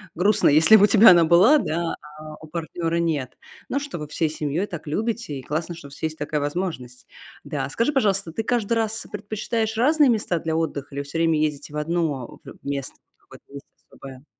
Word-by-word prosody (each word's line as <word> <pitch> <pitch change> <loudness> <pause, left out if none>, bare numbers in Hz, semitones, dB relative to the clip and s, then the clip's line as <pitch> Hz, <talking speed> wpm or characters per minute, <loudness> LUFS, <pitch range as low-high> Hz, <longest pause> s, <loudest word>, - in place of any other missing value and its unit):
грустно, 200 +2 +3
если 160 +9 +6
бы 200 - +4
у - - +2
тебя 220 -1 +8
она 175 -2 +6
была, 185 - +6
да, 170 - -2 0.2
а 155 0 -9
у 155 - -11
партнёра 165 +1 -3
нет. 155 -6 -2 0.3
Ну 280 - 0
что, 285 -9 -6
вы 150 - -6
всей 155 +1 -1
семьёй 155 +5 -2
так 170 -5 -8
любите, 220 - -3
и 130 - -11
классно, 160 +3 -3
что 155 -4 -11
у 140 - -16
вас - - -14
есть 160 0 -2
такая 150 0 -2
возможность. 145 -6 -4 0.4
Да, - - -3
а - - -7
скажи, 230 - 0
пожалуйста, 195 -8 +1
ты 225 - -2
каждый 235 -2 0
раз 225 -1 -2
предпочитаешь 220 +1 -3
разные 295 +2 +4
места 210 -6 0
для 160 0 -2
отдыха 150 -4 -3
или 140 - -3
всё 145 +3 -6
время 165 -2 +2
ездите 150 -1 -3
в 150 - -4
одно 150 -5 -2
в - - -13
место 140 -2 -4 0.2
какое-то, - - -18
есть 140 0 -9 0.2
особое? 135 0 -12
165 Hz, 210 wpm, -23 LUFS, 150-210 Hz, 0.4 s, тебя